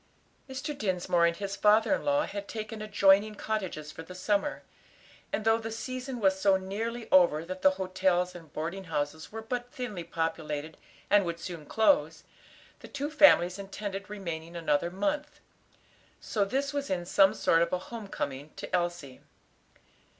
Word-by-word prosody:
Mr. 275 +3 -4
Dinsmore 180 -6 +2
and 170 0 -1
his 200 0 -4
father 210 +6 +4
in - - -1
law 290 +1 +2
had 200 0 -6
taken 215 0 -6
adjoining 205 0 +4
cottages 185 -9 -3
for - - -9
the 180 +3 -10
summer, 205 +8 0 0.7
and 215 - -2
though 225 0 +4
"the 225 0 -5
season" 255 +2 -5
was 190 -2 +2
so 195 -1 +5
nearly 225 +5 -4
over 170 -4 +5
that 185 +1 -6
the 190 - +7
hotels 185 -1 +1
and 165 -4 -12
boarding 170 +5 -4
houses 155 -1 -3
were 220 +1 -6
but 245 +2 -4
thinly 215 -9 -5
populated 160 -2 -3 0.4
and 205 0 +6
would 170 -1 -4
soon 170 -3 -7
close, 225 +6 +2 0.6
the - - -11
two 285 +2 -4
families 200 - +6
intended 200 0 -6
remaining 170 -5 -6
another 165 -1 +1
month. 295 +12 -2 0.8
So 205 -3 0
this 275 +7 -1
was 285 -1 -2
in 175 -2 -1
some 195 +3 +4
sort 170 -4 +3
a 180 - +1
home 220 +3 -8
coming 140 -4 -4
to - - -3
Elsie. 175 -7 -3
195 Hz, 160 wpm, -29 LUFS, 170-220 Hz, 0.8 s, the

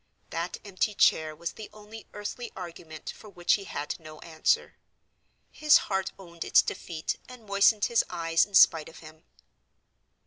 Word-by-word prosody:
That 170 +2 -3
empty 200 +1 -1
chair 155 -5 +3
was 170 +2 -4
the 215 - -10
only 215 +1 -12
earthly 210 +4 -6
argument 165 -4 -8
for 215 - -13
which 175 -3 +1
he 200 - -1
had 150 -3 -5
no 155 -1 -11
answer: 160 -1 0 0.8
his 305 -1 +5
heart 190 -1 -2
owned 170 -3 -8
its - - +5
defeat 160 -2 -4
and 250 -3 -12
moistened 200 +1 +4
his 235 -1 +2
eyes 165 -1 +2
in 205 - -5
spite 160 -3 +6
of 165 - -15
him. 155 0 -15
180 Hz, 160 wpm, -28 LUFS, 165-210 Hz, 0.8 s, spite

